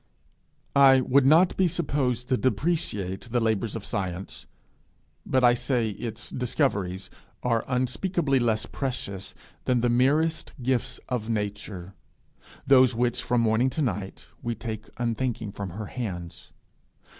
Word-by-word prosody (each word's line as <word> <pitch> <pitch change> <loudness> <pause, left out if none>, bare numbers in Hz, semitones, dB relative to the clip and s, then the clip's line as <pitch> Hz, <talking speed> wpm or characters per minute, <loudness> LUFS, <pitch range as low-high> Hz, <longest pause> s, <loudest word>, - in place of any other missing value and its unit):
I 135 -1 +7
would 135 +1 +4
not 165 +5 +5
be 190 - +3
supposed 135 -7 -1
to 130 - +4
depreciate 120 - -1
the 120 +1 +1
labours 110 -1 0
of 105 -3 -5
science, 95 -3 -4 0.8
but 130 -1 +2
I 120 -1 +7
say 120 -2 0
its 115 +3 -6
discoveries 100 - -1 0.3
are 115 -2 +1
unspeakably 135 +4 +1
less 110 -3 +1
precious 100 -8 -4 0.3
than 125 -2 +2
the 120 - +2
merest 145 +7 +2
gifts 130 +1 0
of 120 -3 -3
Nature, 100 -3 -4 0.7
those 130 -2 +6
which, 120 0 +1
from 120 -1 +1
morning 115 +3 +3
to 150 +4 -1
night, 100 -5 -3 0.2
we 120 0 -2
take 110 -1 -6
unthinking 115 -2 -2
from 100 -1 -5
her 105 +5 -6
hands. 90 -8 -6
120 Hz, 135 wpm, -26 LUFS, 105-130 Hz, 0.8 s, I